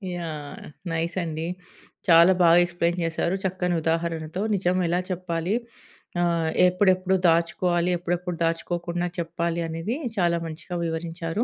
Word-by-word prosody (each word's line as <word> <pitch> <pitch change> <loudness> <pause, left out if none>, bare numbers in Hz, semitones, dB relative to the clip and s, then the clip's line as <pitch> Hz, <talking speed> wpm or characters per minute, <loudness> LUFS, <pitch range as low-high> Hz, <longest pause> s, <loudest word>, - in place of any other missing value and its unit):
Yeah! 155 -4 -6 0.3
Nice 165 +2 -2
అండి. 160 0 -3 0.6
చాలా 170 +3 +8
బాగా 170 0 +7
ఎక్స్‌ప్లెయిన్ 175 0 -1
చేశారు. 165 +2 0
చక్కని 180 -1 0
ఉదాహరణతో. 165 +1 -1
నిజం 180 -1 +1
ఎలా 175 +2 +1
చెప్పాలి. 180 +2 -1 0.7
ఆహ్, 170 -2 +1 0.2
ఎప్పుడెప్పుడు 185 0 +2
దాచుకోవాలి, 170 +1 +2
ఎప్పుడెప్పుడు 175 0 -3
దాచుకోకుండా 175 +1 -1
చెప్పాలి 170 0 -2
అనేది, 165 +10 -3 0.2
చాలా 170 -2 +2
మంచిగా 170 +2 -6
వివరించారు. 165 +4 -2
170 Hz, 115 wpm, -25 LUFS, 165-180 Hz, 0.7 s, చాలా